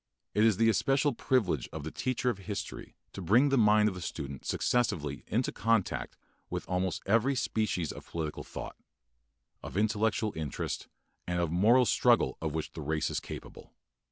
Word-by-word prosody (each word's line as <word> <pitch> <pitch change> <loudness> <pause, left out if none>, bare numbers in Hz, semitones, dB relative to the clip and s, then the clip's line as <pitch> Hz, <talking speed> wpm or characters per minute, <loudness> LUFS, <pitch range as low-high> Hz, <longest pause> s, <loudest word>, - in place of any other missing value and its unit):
It 105 - +3
is 110 -4 +4
the 115 - +4
especial 135 +6 +2
privilege 120 -5 0
of 80 -2 -6
the 80 - -5
teacher 130 -1 0
of 100 - -8
history 100 +1 -6 0.2
to 95 - -6
bring 115 - +4
the 135 - +3
mind 105 -1 +5
of 105 - 0
the 90 - -7
student 70 -5 -6
successively 75 - 0
into 120 +5 0
contact 115 -2 0 0.3
with - - -4
almost 90 0 -1
every 115 +7 +3
species 105 - -1
of - - -11
political 80 -3 -4
effort, - - -7 0.9
of - - -7
intellectual 110 0 +1
interest, 80 -4 -4 0.4
and 90 0 -1
of 85 -2 0
moral 115 +9 +5
struggle - - +3
of 80 -1 -1
which 80 - -3
the 80 - -7
race 75 +1 -1
is - - -1
capable. - - -10
105 Hz, 170 wpm, -30 LUFS, 85-115 Hz, 0.9 s, mind